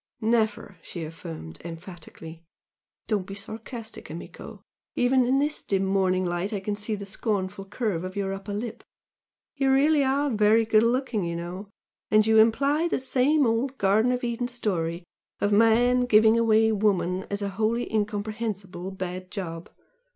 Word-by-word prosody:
"Never!" 220 -1 0
she 170 - -7
affirmed, 80 - -8
emphatically 165 -1 -10 0.6
"Don't 205 -4 -1
be 195 - -7
sarcastic, 220 +2 -7
amico! 165 +3 -9 0.3
even 250 0 +3
in 265 +2 +3
this 295 +2 0
dim 195 -1 0
morning 190 -1 +1
light 175 +3 -2
I 205 - -2
can 205 +2 -3
see 210 +1 -2
the 200 -1 -7
scornful 195 -1 -3
curve 200 -4 -2
of 185 +1 -6
your 195 -1 -2
upper 195 +1 -7
lip! 225 +3 -5 0.7
you 270 -1 +2
are - - +5
really 290 +2 +4 0.3
very 215 +2 +4
good 220 -1 +4
looking, 235 -2 0
you 170 0 -3
know! 180 +4 -6 0.4
and 215 0 +4
you 220 0 +5
imply 280 +9 +3
the - - 0
same 265 +3 +2
old 245 +4 0
Garden 215 +5 +3
of 250 0 -2
Eden 240 0 -1
story 180 -8 -2 0.4
of 205 - +1
man 235 +4 +4
giving 220 0 +6
away 220 -1 +4
woman 190 -3 0
as 200 0 -3
a 200 - -1
wholly 220 +4 0
incomprehensible 205 -3 -3
bad 185 -1 -6
job! 165 -5 -6
210 Hz, 160 wpm, -26 LUFS, 190-230 Hz, 0.7 s, giving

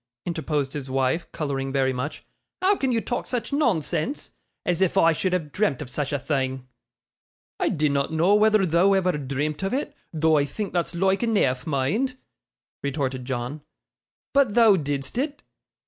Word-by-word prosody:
interposed 150 -5 -2
his 145 -3 -4
pretty 130 - -5
wife, 135 +6 0
colouring 135 -3 -3
very 135 -1 +1
much. 130 +4 -5 0.3
'How 385 +2 +3
can 265 -8 0
you 230 -2 +1
talk 245 - -3
such 245 +1 -3
nonsense? 235 - 0 0.3
As 180 0 0
if 190 - +2
I 165 0 +5
should 185 +4 -1
have 165 -5 -1
dreamt 200 -9 0
of 135 -4 -7
such 145 +2 -2
a 145 - +1
thing!' 130 -2 -2 0.9
'I - - +2
dinnot 145 -2 +1
know 165 +5 +3
whether 215 -1 +4
thou'd 185 +4 +4
ever 185 -1 +2
dreamt 145 +3 -2
of 195 +5 -1
it, 295 +1 -3 0.2
though 160 -1 +3
I 140 - +2
think 200 +6 -5
that's 175 -1 -1
loike 190 +2 +2
eneaf, 155 - +1
mind,' 160 - 0 0.6
retorted 135 -2 -2
John; 130 +3 -4 0.7
'but 275 -7 +3
thou 225 -4 +7
didst 145 - -2
it. 290 +1 -3
160 Hz, 170 wpm, -25 LUFS, 140-205 Hz, 0.9 s, thou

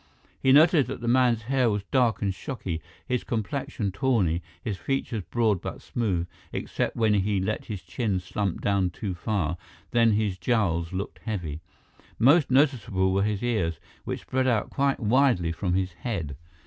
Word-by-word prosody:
He 130 - +4
noted 150 -1 +6
that 135 - -5
the 120 - -5
man's 120 -2 +3
hair 130 0 +2
was 105 -2 -1
dark 120 -6 +2
and 100 -1 +1
shocky, 95 - -5 0.2
his 125 -1 -1
complexion 120 0 -2
tawny, 100 -7 +1 0.2
his 105 -4 -3
features 120 -1 -2
broad 110 -6 +2
but - - -5
smooth, 95 -8 -1 0.3
except - - -2
when 110 -2 +3
he 100 0 +1
let 105 +3 -2
his 105 -5 -6
chin 95 +2 -1
slump 95 +1 -3
down 100 -2 +2
too 95 +2 -4
far; 90 -3 -1 0.3
then, 115 -2 +4
his 105 -3 0
jowls 90 -9 +1
looked 95 +2 -4
heavy. 85 -9 -4 0.6
Most 140 +6 +5
noticeable 120 -9 +2
were 100 - +2
his 105 +1 -1
ears, 105 -9 0 0.2
which - - -4
spread 130 0 0
out 115 -4 +1
quite 140 0 +1
widely 115 -7 +3
from 90 +1 -1
his 95 -2 -1
head. 85 - -4
105 Hz, 165 wpm, -26 LUFS, 95-125 Hz, 0.6 s, noted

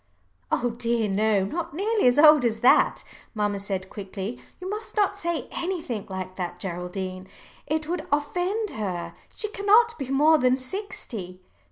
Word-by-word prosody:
"Oh 245 0 +1
dear 235 -1 0
no, 205 0 +2
not 330 - -4
nearly 420 - +2
as 245 +2 +4
old 300 -2 +8
as 225 -2 0
that," 245 - +4 0.3
mamma 205 -1 0
said 195 -1 -3
quickly. 200 +3 -6 0.2
"You 365 - -6
must 425 +3 -5
not 400 -1 +3
say 340 -4 -3
anything 330 - -3
like 185 -1 -6
that, 175 -1 -4
Geraldine. 185 +1 -5 0.4
It 310 0 -1
would 345 -1 -3
offend 355 +9 0
her. 185 -5 -4 0.2
She 430 - -3
cannot 435 +2 +4
be 270 -2 -4
more 300 +3 +5
than 255 0 +3
sixty." 255 - -6
250 Hz, 155 wpm, -25 LUFS, -, 0.4 s, old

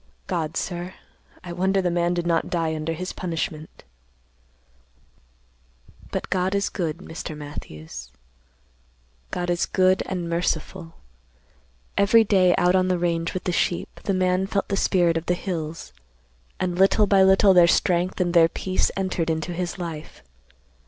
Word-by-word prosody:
God, 160 0 -2
sir, 175 +1 -4 0.5
I 175 - -6
wonder 190 +2 +1
the 180 -2 0
man 175 0 +1
did 175 -1 -2
not 170 -1 +1
die 165 -2 -1
under 155 +1 -3
his 185 +3 -5
punishment! 160 -3 -5 2.3
"But - - -4
God 185 +1 +1
is 200 0 0
good, 165 -5 -3
Mr. 160 -1 -7
Matthews. 80 - -9 1.2
God 175 0 -2
is 175 - 0
good 185 0 +3
and 180 -2 -3
merciful. 170 0 -2 1.0
Every 225 +3 +6
day 185 -4 +4
out 180 +1 +3
on 185 0 +3
the 185 -1 +1
range 170 -1 -1
with 185 - -3
the 180 - -1
sheep, 175 0 -1
the 195 - +1
man 185 +1 +1
felt 195 - -2
the 200 - 0
spirit 175 -4 +2
of 165 - -5
the 180 - +2
hills, 165 - -5 0.7
and 180 -1 -2
little 195 +2 +5
by 195 -1 +4
little 190 +1 +6
their 175 -2 +7
strength 175 +2 +1
and 175 -1 0
their 165 -2 +6
peace 185 +2 0
entered 185 -4 -1
into 160 +2 -2
his 175 +1 -3
life. 165 - -7
175 Hz, 150 wpm, -24 LUFS, 165-185 Hz, 2.3 s, their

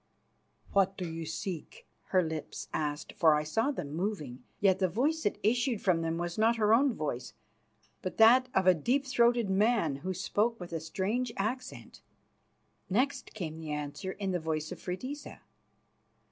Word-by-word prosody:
"What 195 -1 +3
do 180 - -3
you 165 -1 -5
seek?" 165 0 -5 0.2
her 185 -1 +3
lips 160 -2 -5
asked, 150 -1 -2
for 160 -3 +5
I 150 - 0
saw 225 - 0
them 150 - -4
moving. 160 - -3 0.2
Yet 195 -2 +3
the 190 - +3
voice 280 - 0
that 205 - 0
issued 240 +1 +2
from 180 -4 +2
them 165 0 -1
was 175 +2 -3
not 225 +2 +4
her 215 -1 +3
own 260 +1 +4
voice, 140 - -4 0.7
but 185 - -5
that 250 +3 +7
of 190 - +3
a 185 - +7
deep 250 - 0
throated 240 -3 +3
man, 200 - +2
who 185 +6 -4
spoke 215 +5 0
with 175 -2 -8
a 165 - -1
strange 205 +9 -2
accent. 250 +6 -4 0.9
Next 255 +9 0
came 160 -6 -5
the 155 -2 -4
answer 150 +6 -4
in 195 -2 -3
the 180 - 0
voice 155 -1 -3
of - - -6
Freydisa. 255 +11 -6
190 Hz, 170 wpm, -31 LUFS, 160-230 Hz, 0.9 s, that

